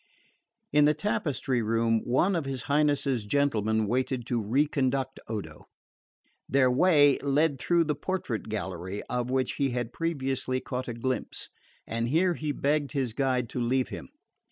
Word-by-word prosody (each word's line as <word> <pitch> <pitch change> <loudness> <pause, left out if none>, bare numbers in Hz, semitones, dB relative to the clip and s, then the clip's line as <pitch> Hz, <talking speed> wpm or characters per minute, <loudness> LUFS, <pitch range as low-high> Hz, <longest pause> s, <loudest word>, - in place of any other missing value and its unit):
In 150 0 +6
the 150 +1 +4
tapestry 145 - -1
room 115 0 +1
one 175 +10 +2
of 165 -4 -1
his 135 -2 -4
Highness's 145 -4 +1
gentlemen 110 -3 +1
waited 125 +2 -1
to 120 -1 -1
reconduct 135 +2 0
Odo. 95 -9 -6 0.8
Their 130 -2 +4
way 145 0 +5
lay 145 +3 +2
through 170 +6 +2
the 155 -1 0
portrait 145 - -3
gallery 95 -2 -4
of 125 0 -1
which 130 -1 0
he 140 -1 +1
had 120 -1 -3
previously 135 -5 -1
caught 130 0 -4
a 120 - -3
glimpse, 130 +2 -3 0.4
and 115 +1 -2
here 175 +5 +3
he 155 -2 -3
begged 145 0 0
his 130 -6 -1
guide 130 -1 0
to 125 - -3
leave 130 +2 +1
him. - - -8
130 Hz, 155 wpm, -28 LUFS, 120-145 Hz, 0.8 s, In